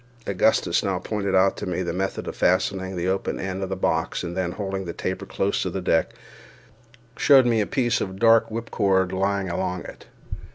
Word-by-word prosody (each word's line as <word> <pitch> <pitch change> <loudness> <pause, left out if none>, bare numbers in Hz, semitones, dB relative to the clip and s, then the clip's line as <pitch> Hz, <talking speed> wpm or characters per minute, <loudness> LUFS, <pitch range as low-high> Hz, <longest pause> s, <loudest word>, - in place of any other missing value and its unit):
Augustus 95 -2 +2
now 95 -2 0
pointed 100 +1 -2
out 95 +1 +4
to - - -6
me 90 0 -2
the 85 -1 -3
method 95 +2 -3
of - - -5
fastening 95 +1 +1
the 90 0 -2
open 95 +1 -1
end 95 0 -4
of 95 - -3
the 95 - -2
box, 80 -2 -1
and 85 0 -5
then, 90 -2 -2
holding 95 -2 -4
the 85 - -5
taper 95 +1 -4
close 100 +1 -1
to 95 - -1
the 95 - -4
deck, 80 -3 +1 1.0
showed 135 -3 +6
me 115 -2 +2
a 105 - -1
piece 120 -4 0
of 95 -1 -4
dark 115 +1 +5
whipcord 100 -5 0
lying 95 +1 0
along 90 +1 -2
it. - - -12
95 Hz, 200 wpm, -24 LUFS, 90-100 Hz, 1.0 s, showed